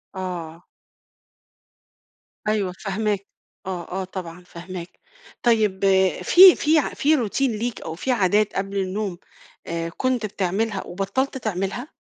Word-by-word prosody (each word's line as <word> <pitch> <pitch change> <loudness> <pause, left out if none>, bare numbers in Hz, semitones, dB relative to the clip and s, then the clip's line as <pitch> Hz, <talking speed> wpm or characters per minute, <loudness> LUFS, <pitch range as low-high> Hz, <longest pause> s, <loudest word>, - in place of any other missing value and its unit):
آه. 175 -2 -5 1.8
أيوه، 205 -4 +1
فاهماك، 200 +1 -2 0.4
آه 180 -3 -5
آه، 190 +1 -2
طبعًا 180 -2 -8
فاهماك. 175 0 -9 0.4
طيب 215 -5 +2 0.4
في 370 0 +9
في 300 - -1 0.2
في 300 +2 +3
routine 230 +1 -2 0.2
ليك، 240 -1 -3
أو 160 0 -6
فيه 255 +8 -1
عادات 205 0 +2
قبل 195 +1 -2
النوم، 190 -1 -2 0.5
آآ، 165 0 -3
كنت 255 +3 -1
بتعملها 200 +1 -1
وبطَّلت 260 +9 -2
تعملها؟ 215 - -3
195 Hz, 115 wpm, -23 LUFS, 180-220 Hz, 1.8 s, في